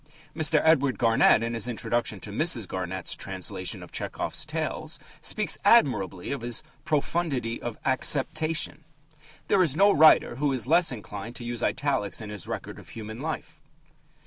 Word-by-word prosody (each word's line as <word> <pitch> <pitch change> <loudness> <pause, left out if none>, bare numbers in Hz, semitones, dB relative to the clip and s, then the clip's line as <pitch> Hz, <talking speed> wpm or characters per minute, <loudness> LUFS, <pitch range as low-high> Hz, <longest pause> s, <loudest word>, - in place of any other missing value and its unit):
Mr. 155 -1 +3
Edward 140 -5 +3
Garnett, 115 -1 +4
in 115 0 -2
his 115 0 0
introduction 120 -2 -2
to 100 - -7
Mrs. 120 - +2
Garnett's 95 0 -4
translation - - -5
of - - -13
Tchehov's - - -3
tales, - - -3 0.2
speaks - - +2
admirably 95 +2 +3
of 140 - -3
his 120 +2 -2 0.2
"profundity 145 -6 -1
of 120 -2 -5
acceptation." 150 +4 0 0.6
There 195 - +3
is 155 -6 +2
no 200 +4 +5
writer 155 -6 +5
who 145 0 +1
is 125 -4 -2
less 165 +3 +4
inclined 105 0 -7
to 120 - -6
use 120 0 -3
italics 120 -11 -1
in 105 -2 -7
his 105 -4 -7
record - - -6
of - - -14
human 110 0 -8
life. 155 0 -6
125 Hz, 155 wpm, -26 LUFS, 110-155 Hz, 0.6 s, no